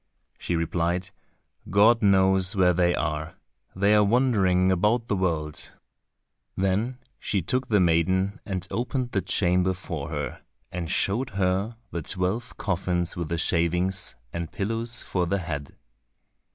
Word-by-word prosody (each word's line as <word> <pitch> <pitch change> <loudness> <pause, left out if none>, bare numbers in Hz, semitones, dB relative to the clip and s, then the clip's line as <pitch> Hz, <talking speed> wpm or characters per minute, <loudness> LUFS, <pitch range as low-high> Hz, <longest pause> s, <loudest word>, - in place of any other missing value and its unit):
She 85 - -2
replied, 85 +3 -1 0.6
"God 110 +5 +5
knows 95 -1 +4
where 90 -2 +4
they 90 0 +2
are, 75 0 -3 0.4
they 100 +2 +3
are 105 0 +6
wandering 100 -6 +3
about 105 +6 +2
the 105 - -1
world." 80 -5 -2 0.8
Then 100 +7 0 0.2
she 100 -5 -1
took 130 +8 -1
the 105 -3 +3
maiden 95 +5 +2
and 95 -2 -3
opened 125 +1 -2
the 95 - 0
chamber 90 0 +2
for 80 -5 -5
her, - - -4 0.3
and 85 -2 -4
showed 105 +7 +1
her 95 +4 0
the 85 - -3
twelve 95 +8 -2
coffins 90 -2 -1
with 85 -3 -4
the 85 - -1
shavings, 90 +3 0 0.2
and 85 -1 -4
pillows 115 +4 -3
for 90 -2 -1
the 100 - +1
head. 80 -6 -5
95 Hz, 140 wpm, -26 LUFS, 85-105 Hz, 0.8 s, are